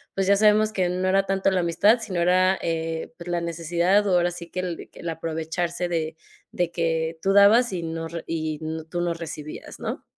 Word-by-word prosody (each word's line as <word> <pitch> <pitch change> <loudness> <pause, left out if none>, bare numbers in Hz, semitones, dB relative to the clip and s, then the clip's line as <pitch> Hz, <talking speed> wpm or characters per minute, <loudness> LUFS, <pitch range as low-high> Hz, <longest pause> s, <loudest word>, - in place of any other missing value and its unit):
pues, 195 -1 0
ya 200 - +6
sabemos 215 0 +4
que 185 -4 0
no 185 +1 -1
era 195 +1 +3
tanto 195 0 +1
la 190 - +1
amistad, 200 +7 +4
sino 195 -6 -4
era, 185 +2 +3
eh, 165 +1 -3
pues, 170 - -10
la 175 -1 -1
necesidad 170 +4 +1
o 195 - +1
ahora 175 0 +2
sí 170 -1 -9
que 185 - -5
el 175 -2 -5
el 170 - -6
aprovecharse 165 +2 -3
de 160 -2 -2 0.4
de 175 -1 -1
que 165 -1 -1
tú 195 - +2
dabas 205 +3 +6
y 175 -2 -3
no 165 0 -4
re 170 0 -6
y 155 -2 -3
no 160 0 -5
tú 175 +2 -3
no 175 -1 0
recibías, 155 -2 -8
¿no? - - -4
175 Hz, 210 wpm, -24 LUFS, 165-190 Hz, 0.4 s, ya